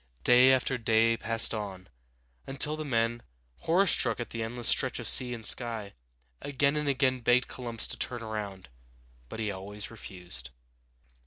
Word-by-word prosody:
Day 125 +2 +6
after 130 0 0
day 115 0 +2
passed 115 0 +1
on, 95 -4 -6 0.6
until 145 +3 +1
the 155 - -6
men, 120 -3 -1 0.4
horror 180 +5 +1
struck 180 - +2
at 120 - -6
the 115 - -5
endless 115 +1 -2
stretch - - +1
of - - -5
sea 125 -1 +5
and 115 -2 -3
sky, 115 -5 +2 0.5
again 140 +1 0
and 150 -1 -1
again 130 -2 +1
begged 125 +1 +2
Columbus 120 -3 -4
to - - -4
turn 120 -2 -3
around; 105 -4 -6 0.6
but - - -8
he 105 -2 -2
always 100 +3 -7
refused. 90 - -8
115 Hz, 160 wpm, -28 LUFS, 110-130 Hz, 0.6 s, Day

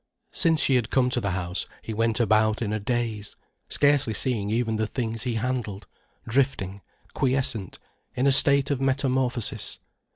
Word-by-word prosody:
Since 165 -3 +2
she 135 - +2
had 115 -4 -2
come 125 -1 +2
to 125 - +1
the 100 - -1
house 90 0 -3 0.2
he 110 - -5
went 115 +1 0
about 110 0 +2
in 105 -1 -2
a 110 - -1
daze, 110 -2 -3 0.3
scarcely 145 -6 +2
seeing 110 -5 +1
even 110 0 0
the 110 0 0
things 115 -2 -3
he 120 -2 -1
handled, 110 -4 -3 0.4
drifting, 110 -6 0 0.3
quiescent, 130 -7 -1 0.4
in 130 - 0
a 140 - +5
state 140 0 +4
of 135 -2 -1
metamorphosis. 130 -3 -1
120 Hz, 160 wpm, -25 LUFS, 110-130 Hz, 0.4 s, a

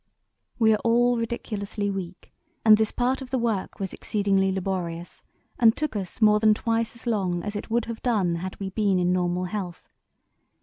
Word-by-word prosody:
"We 220 -2 +4
are 210 - +1
all 240 +1 +3
ridiculously 210 -3 -3
weak, 185 -2 -7 0.3
and 215 -1 +9
this 220 0 +1
part 255 +2 0
of 260 - -8
the 260 - 0
work 225 -5 -2
was 195 -2 -4
exceedingly 195 -2 +1
laborious 180 -3 -4 0.4
and 225 -3 +5
took 305 -6 -2
us 195 +2 -5
more 210 -1 +5
than 215 0 +4
twice 230 +1 -1
as 235 - -12
long 190 -7 0
as 210 0 -4
it 205 - -5
would 235 0 +1
have 230 -1 -6
done 195 -9 +1
had 185 +2 -6
we 195 -1 -4
been 200 -2 +1
in 180 0 +2
normal 180 0 0
health. 180 -2 -6
210 Hz, 185 wpm, -25 LUFS, 185-230 Hz, 0.4 s, and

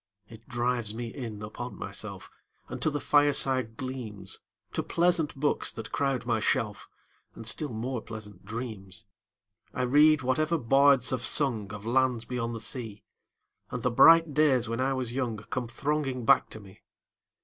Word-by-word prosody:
It 115 +1 -14
drives 120 -3 -1
me 115 -1 -5
in 110 -5 -6
upon 120 +4 -7
myself 100 -1 -6 0.4
5 - - -20
And - - -6
to - - +3
the 145 -1 -2
fireside 135 -6 +2
gleams, 125 -6 -6 0.3
To - - 0
pleasant 170 -3 +1
books 145 +2 0
that 110 -1 -8
crowd 135 -3 -1
my 115 -2 +1
shelf, 105 -1 -1 0.5
And 115 - -9
still 145 +7 0
more 120 +2 -3
pleasant 110 -4 -10
dreams. 105 -2 -7 0.7
I 125 - 0
read 150 +3 +5
whatever 155 +6 +1
bards 135 -1 +4
have 130 -2 -1
sung 120 -7 +1
Of 105 0 -8
lands 125 -1 +1
beyond 120 -1 -3
the - - -5
sea, 110 -1 -5 0.7
10 - - -6
And 120 - -8
the 125 - +1
bright 165 +4 +7
days 135 -5 +3
when 115 +1 -3
I 135 +1 +1
was 125 -3 -2
young 125 -4 -2
Come 120 +3 -4
thronging 135 0 -2
back 135 +1 +4
to 110 - -8
me. 95 -2 -16
125 Hz, 170 wpm, -28 LUFS, 110-135 Hz, 0.7 s, bright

